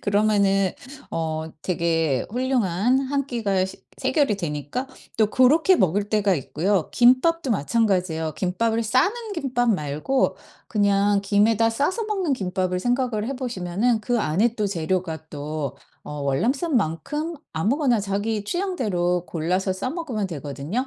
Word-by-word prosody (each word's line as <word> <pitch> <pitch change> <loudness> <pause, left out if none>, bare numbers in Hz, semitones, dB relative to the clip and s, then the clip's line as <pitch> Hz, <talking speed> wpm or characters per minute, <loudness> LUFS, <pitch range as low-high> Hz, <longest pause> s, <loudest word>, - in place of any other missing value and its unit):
그러면은 200 -2 +2 0.4
어 160 -1 -2
되게 165 -5 0
훌륭한 245 -2 +1
1 275 0 -1
끼가 200 -7 0
식 190 - -10 0.2
해결이 280 - +2
되니까 150 - -3 0.3
또 220 - +4
고렇게 310 +8 +5
먹을 200 +2 +1
때가 205 -3 +2
있고요. 170 +6 -1
김밥도 260 +5 +4
마찬가지예요. 180 -5 0
김밥을 225 +5 0
싸는 400 - +1
김밥 245 -6 0
말고 155 - 0 0.3
그냥 200 -1 +2
김에다 215 +3 +3
싸서 295 - 0
먹는 390 -8 -1
김밥을 185 -3 -1
생각을 245 -3 0
해 275 - -2
보시면은 225 -1 -1
그 235 +1 0
안의 210 +9 +1
또 210 - 0
재료가 170 -3 -2
또 145 -2 -4 0.3
어 150 -1 -6
월남쌈만큼 255 - 0 0.2
아무거나 240 - +1
자기 205 +2 -2
취향대로 205 - -1
골라서 185 +4 -1
싸 255 +7 -3
먹으면 270 - -3
되거든요. 150 - -4
205 Hz, 295 characters per minute, -23 LUFS, 175-255 Hz, 0.4 s, 고렇게